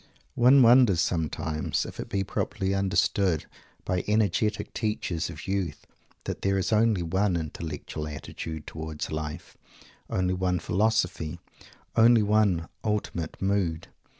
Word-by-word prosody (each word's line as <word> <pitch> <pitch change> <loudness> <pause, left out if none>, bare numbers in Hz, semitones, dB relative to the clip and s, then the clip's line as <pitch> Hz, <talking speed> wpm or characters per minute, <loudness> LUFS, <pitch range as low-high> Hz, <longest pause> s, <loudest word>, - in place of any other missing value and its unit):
One 130 +2 +6
wonders 120 -6 +6
sometimes 80 -3 -1
if - - -9
it - - -5
be 100 -1 0
properly 95 0 -2
understood 95 -3 +1 0.4
by 90 -1 0
energetic 105 0 +1
teachers 90 -7 -2
of 75 0 -9
youth 95 -6 -2 0.4
that - - -5
there 100 0 +1
is 95 +3 0
only 110 -4 +3
one 95 +3 +1
intellectual 80 -1 -5
attitude 75 +1 -7
towards 80 -1 -6
life, 75 -1 -5 0.5
only 90 0 0
one 90 -1 0
philosophy, 90 -5 0 0.6
only 115 -1 +6
one 100 -5 +2 0.2
ultimate 105 -6 -2
mood. 95 -5 -1
95 Hz, 125 wpm, -27 LUFS, 80-105 Hz, 0.6 s, One